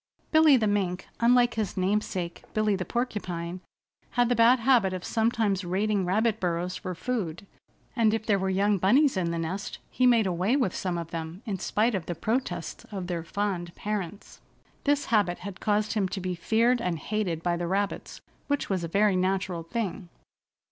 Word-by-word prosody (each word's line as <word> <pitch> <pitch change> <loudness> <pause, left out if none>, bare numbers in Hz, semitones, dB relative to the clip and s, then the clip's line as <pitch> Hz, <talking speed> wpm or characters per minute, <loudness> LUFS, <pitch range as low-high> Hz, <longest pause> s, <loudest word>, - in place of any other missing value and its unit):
Billy 315 -3 +7
the 225 - +1
Mink, 190 -3 -1
unlike 240 +1 +4
his 215 -4 -3
namesake 185 -2 -1
Billy 215 -1 +2
the 185 - -2
Porcupine, 185 -8 -3 0.6
had 245 -1 +4
the 245 - +3
bad 235 +3 +6
habit 230 -6 +4
of 185 -1 -5
sometimes 220 -4 +1
raiding 195 +2 0
rabbit 220 +3 +1
burrows 180 0 -1
for 185 -3 -5
food, 195 -5 -3 0.5
and 225 -3 +4
if 220 0 -2
there 200 -3 +2
were 190 0 -1
young 200 +1 +2
bunnies 255 - +4
in 180 -3 0
the 170 - -2
nest 175 +5 -4
he 255 - +3
made 230 -3 +5
away 185 +6 +1
with 250 -10 +1
some 180 -2 -2
of 170 -1 -6
them 165 +4 -6
in 200 -5 -3
spite 225 +6 +1
of 185 -5 -3
the 175 - -3
protests 205 -3 -2
of 190 -3 -4
their 175 -2 -3
fond 175 -1 -3
parents. 205 -2 -5 0.4
This 290 0 +2
habit 200 -5 +3
had 190 0 -8
caused 210 0 +1
him 200 -4 0
to 195 - -4
be 185 0 -2
feared 230 +7 +2
and 180 -4 -1
hated 175 -1 -2
by 175 -1 +1
the 170 0 -3
rabbits, 195 +2 -2 0.3
which 285 -7 -1
was 185 -3 0
a - - -2
very 200 +3 +3
natural 185 -1 0
thing. 190 +1 -4
195 Hz, 185 wpm, -27 LUFS, 180-220 Hz, 0.6 s, Billy